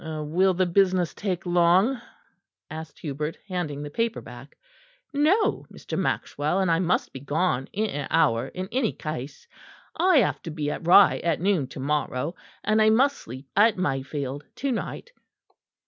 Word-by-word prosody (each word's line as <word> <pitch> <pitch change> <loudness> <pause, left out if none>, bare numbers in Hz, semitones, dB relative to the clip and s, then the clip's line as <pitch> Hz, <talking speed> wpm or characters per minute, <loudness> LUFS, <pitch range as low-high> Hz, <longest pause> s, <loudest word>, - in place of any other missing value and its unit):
"Will 160 +4 0
the 185 +1 +2
business 180 -1 +2
take 190 -3 -3
long?" 180 +8 +3 0.7
asked 160 0 -8
Hubert, 150 +1 -4
handing 160 -7 -3
the 145 - -7
paper 230 +5 -1
back. 125 +3 -12 0.6
"No, 315 +10 +2
Mr. - - -7
Maxwell; 155 +6 -1
and 190 -3 +2
I 165 - +3
must 180 -1 0
be 135 - -7
gone 145 -1 -1
in 215 +2 -1
an 145 -1 -4
hour 115 +3 +2
in 185 +5 -6
any 250 -3 0
case. 145 -2 -7 0.5
I 360 0 +4
have 240 - +2
to - - -7
be 150 -2 -3
at 165 - -6
Rye 190 +2 +7
at 165 -2 0
noon 180 -6 +1
to 135 - -10
morrow; 145 +1 -1 0.3
and 215 +1 +2
I 215 - +5
must 270 +6 +4
sleep 130 - -10
at 210 +1 +4
Mayfield 140 -3 -3
to 275 0 -2
night." 370 - -5
170 Hz, 160 wpm, -25 LUFS, 145-200 Hz, 0.7 s, Rye